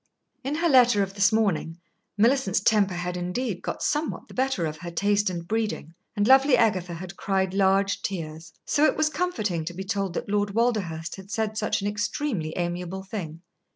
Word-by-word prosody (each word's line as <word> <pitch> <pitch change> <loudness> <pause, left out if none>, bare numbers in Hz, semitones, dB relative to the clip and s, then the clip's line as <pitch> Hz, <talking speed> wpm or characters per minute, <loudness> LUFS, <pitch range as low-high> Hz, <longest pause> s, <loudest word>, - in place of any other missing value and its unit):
In 275 +3 -2
her 335 +2 +1
letter 245 -8 +5
of 195 0 -5
this 195 -1 +3
morning, 195 -7 0 0.4
Millicent's 230 -3 +3
temper 200 -2 +2
had 180 0 -3
indeed 180 +3 -3
got - - -4
somewhat 300 +1 -1
the - - -12
better 260 -9 0
of 155 0 -4
her 175 +1 -6
taste 205 +3 +1
and 170 -2 -5
breeding, 215 -7 -2 0.2
and 205 0 +1
lovely 270 +1 +6
Agatha 185 -6 +1
had 180 +2 -8
cried 190 -1 0
large 195 0 +2
tears. 160 -3 -5
So 295 - +3
it - - +2
was 310 0 +2
comforting 215 - -1
to 175 +1 -5
be 190 - -4
told 195 -2 -2
that - - -3
Lord 205 0 0
Walderhurst 200 -10 -1
had 190 0 -11
said 220 -1 -2
such 215 -2 -1
an - - 0
extremely 205 - -2
amiable 180 +2 -3
thing. 175 -5 -6
200 Hz, 190 wpm, -26 LUFS, 175-225 Hz, 0.4 s, lovely